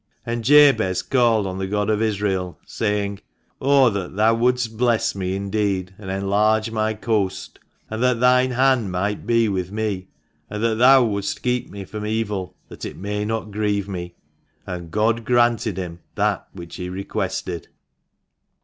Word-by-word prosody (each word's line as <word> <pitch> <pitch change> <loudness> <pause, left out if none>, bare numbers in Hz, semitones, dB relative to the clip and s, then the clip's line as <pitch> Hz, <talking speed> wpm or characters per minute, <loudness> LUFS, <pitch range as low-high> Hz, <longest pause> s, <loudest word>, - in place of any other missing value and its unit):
And 115 -1 -3
Jabez 115 -10 +5
called 120 -5 +2
on 95 0 -4
the 95 - -2
God 105 +1 -1
of 105 0 0
Israel, 100 -4 -1
saying, 100 -2 -2 0.4
O 135 -3 +5
that 95 -3 -4
Thou 110 +2 +4
wouldst 120 -1 +1
bless 120 -1 +1
me 95 -1 -2
indeed, 100 -2 -1
and 95 -3 -8
enlarge 105 +3 +1
my 110 0 0
coast, 100 -4 -2 0.3
and 110 +1 -5
that 125 -2 +2
Thine 125 +1 +4
hand 130 -5 +2
might 100 +3 -2
be 115 -1 +3
with 95 -2 -2
me, 105 -3 -3 0.4
and 105 +1 -4
that 115 -1 +1
Thou 130 +1 +7
wouldst 100 -3 -2
keep 125 -1 0
me 100 -1 -8
from 105 +2 -6
evil, 105 -4 -2
that - - -11
it - - -6
may 105 +2 -3
not 110 -1 -3
grieve 100 -1 -1
me 90 -3 -6 0.5
1 90 - -5
And 85 -2 -9
God 110 +3 +1
granted 120 -3 +2
him 90 -2 -5 0.2
that - - 0
which 85 -1 -10
he 90 -1 -5
requested. 90 -2 -4
105 Hz, 165 wpm, -22 LUFS, 95-115 Hz, 0.5 s, Thou